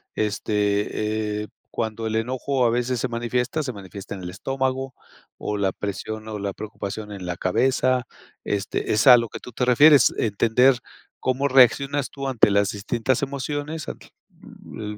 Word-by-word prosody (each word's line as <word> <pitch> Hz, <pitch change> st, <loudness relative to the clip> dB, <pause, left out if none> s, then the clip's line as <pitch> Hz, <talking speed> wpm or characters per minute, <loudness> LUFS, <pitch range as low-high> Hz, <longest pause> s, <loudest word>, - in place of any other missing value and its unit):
este, 105 Hz, 0 st, -1 dB
eh, -, -, -8 dB, 0.2 s
cuando 110 Hz, 0 st, -3 dB
el 110 Hz, -, -2 dB
enojo 130 Hz, +3 st, 0 dB
a -, -, +4 dB
veces 120 Hz, +1 st, 0 dB
se 130 Hz, -, 0 dB
manifiesta, 125 Hz, +5 st, -1 dB
se 130 Hz, -3 st, -4 dB
manifiesta 100 Hz, 0 st, -9 dB
en 95 Hz, -, -9 dB
el 90 Hz, -, -5 dB
estómago, 130 Hz, +5 st, -2 dB, 0.4 s
o 105 Hz, -, -3 dB
la 95 Hz, -1 st, +1 dB
presión, 110 Hz, +2 st, -5 dB
o 105 Hz, -1 st, -4 dB
la 100 Hz, -1 st, -3 dB
preocupación 105 Hz, 0 st, -6 dB
en 95 Hz, -3 st, -7 dB
la 90 Hz, -1 st, -4 dB
cabeza, 130 Hz, +5 st, +1 dB, 0.4 s
este, 100 Hz, +1 st, -2 dB
es 110 Hz, +6 st, +2 dB
a 125 Hz, -1 st, +11 dB
lo 115 Hz, -2 st, -1 dB
que -, -, -7 dB
tú 125 Hz, -, -11 dB
te 125 Hz, +2 st, -1 dB
refieres, 145 Hz, +1 st, +6 dB
entender 115 Hz, +4 st, +3 dB, 0.4 s
cómo 130 Hz, +2 st, 0 dB
reaccionas 135 Hz, +1 st, +4 dB
tú 135 Hz, -1 st, -5 dB
ante 120 Hz, -5 st, +4 dB
las 100 Hz, 0 st, +2 dB
distintas 115 Hz, +5 st, -1 dB
emociones 145 Hz, +3 st, -4 dB
ant -, -, -7 dB
l 185 Hz, -, -11 dB
115 Hz, 165 wpm, -23 LUFS, 105-130 Hz, 0.4 s, a